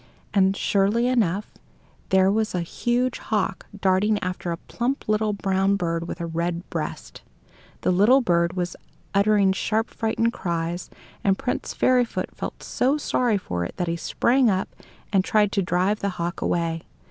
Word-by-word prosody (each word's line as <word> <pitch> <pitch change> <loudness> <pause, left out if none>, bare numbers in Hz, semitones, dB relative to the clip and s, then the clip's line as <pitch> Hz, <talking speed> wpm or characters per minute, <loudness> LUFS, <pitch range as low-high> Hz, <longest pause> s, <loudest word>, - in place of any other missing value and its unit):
And, 195 -1 +3
surely 205 +4 +2
enough, 210 -6 +1 0.6
there 190 0 +4
was 215 -1 0
a 180 - 0
huge 240 +8 -1
hawk 205 -3 -2
darting 195 +3 +3
after 180 -1 -3
a 170 - -2
plump 245 +9 -3
little 215 0 +2
brown 195 -1 +1
bird 170 -3 -2
with - - -6
a 170 - -2
red 170 +1 -2
breast. - - -5 0.6
The - - +2
little 210 +9 +5
bird 170 -7 +2
was 180 0 -3 0.4
uttering 200 -1 +4
sharp 220 +3 -1
frightened 225 +1 0
cries, 170 -1 -3 0.3
and 195 -1 +3
Prince 250 - -3
Fairyfoot 250 -2 +1
felt - - -6
so 270 +4 +1
sorry 245 -6 +1
for 90 - -3
it - - -6
that 180 -2 -1
he 165 - 0
sprang 240 +8 +2
up 190 -1 0 0.4
and 190 -1 +4
tried 210 0 +2
to 200 - +1
drive 185 +3 +1
the 200 - -1
hawk 175 -2 -4
away. 165 -1 0
195 Hz, 160 wpm, -24 LUFS, 175-220 Hz, 0.6 s, little